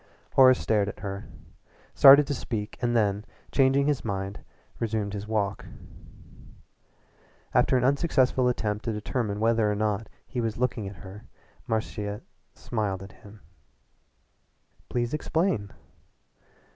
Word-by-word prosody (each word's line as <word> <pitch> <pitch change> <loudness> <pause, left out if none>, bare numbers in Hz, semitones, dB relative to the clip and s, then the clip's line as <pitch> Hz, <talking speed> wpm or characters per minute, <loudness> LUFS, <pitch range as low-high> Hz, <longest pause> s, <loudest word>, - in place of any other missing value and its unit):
Horace 130 -1 +7
stared 105 -2 +1
at - - -10
her, 100 0 -5 0.7
started 140 +2 +8
to 145 - -2
speak 110 -5 -4
and 120 -1 0
then, 105 -2 +1 0.3
changing 135 0 +3
his 145 -2 0
mind, 100 -2 -4 0.4
resumed 110 -3 -2
his 105 0 -5
walk. 105 -3 -1 1.9
After 130 - +3
an 125 - 0
unsuccessful 130 -2 +2
attempt 105 -4 -1
to 115 - -1
determine 105 -1 -3
whether 110 -1 +2
or - - -1
not 105 +1 -1 0.2
he 125 - -4
was 115 -2 -2
looking 115 -4 -1
at 100 - -8
her 95 +3 -11 0.4
Marcia 105 -2 -3 0.3
smiled 100 -4 -3
at 95 - -11
him. 105 +1 -16 1.5
"Please 120 +1 -1
explain." 150 - -1
110 Hz, 125 wpm, -27 LUFS, 105-125 Hz, 1.9 s, started